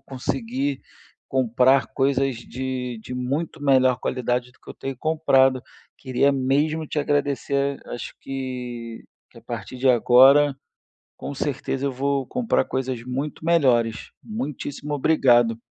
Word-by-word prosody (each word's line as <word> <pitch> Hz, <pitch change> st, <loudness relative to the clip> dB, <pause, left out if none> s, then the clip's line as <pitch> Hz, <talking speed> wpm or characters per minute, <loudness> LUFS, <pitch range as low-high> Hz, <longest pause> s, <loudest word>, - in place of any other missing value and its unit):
conseguir 130 Hz, +1 st, -3 dB, 0.5 s
comprar 130 Hz, 0 st, +3 dB
coisas 135 Hz, -2 st, 0 dB
de 125 Hz, 0 st, -5 dB
de 125 Hz, -, -8 dB
muito 140 Hz, +5 st, -3 dB
melhor 130 Hz, -3 st, +4 dB
qualidade 125 Hz, 0 st, -2 dB
do -, -, -28 dB
que -, -, -12 dB
eu -, -, -9 dB
tenho 135 Hz, -1 st, -6 dB
comprado. 135 Hz, -5 st, +3 dB, 0.4 s
Queria 135 Hz, +2 st, +1 dB
mesmo 145 Hz, +4 st, 0 dB
te 150 Hz, -, -3 dB
agradecer, 140 Hz, -1 st, 0 dB
acho 120 Hz, -, -6 dB
que 125 Hz, -3 st, -6 dB, 0.3 s
que -, -, -23 dB
a -, -, -17 dB
partir -, -, -7 dB
de 130 Hz, +1 st, +1 dB
agora, 135 Hz, +4 st, +6 dB, 0.6 s
com 140 Hz, -, -6 dB
certeza 140 Hz, 0 st, -2 dB
eu -, -, 0 dB
vou 135 Hz, +1 st, -1 dB
comprar 245 Hz, -, 0 dB
coisas 130 Hz, -2 st, -3 dB
muito 135 Hz, +5 st, -4 dB
melhores. 125 Hz, -9 st, +2 dB
Muitíssimo 150 Hz, -, -5 dB
obrigado. 120 Hz, -6 st, +3 dB
130 Hz, 130 wpm, -23 LUFS, 125-140 Hz, 0.6 s, agora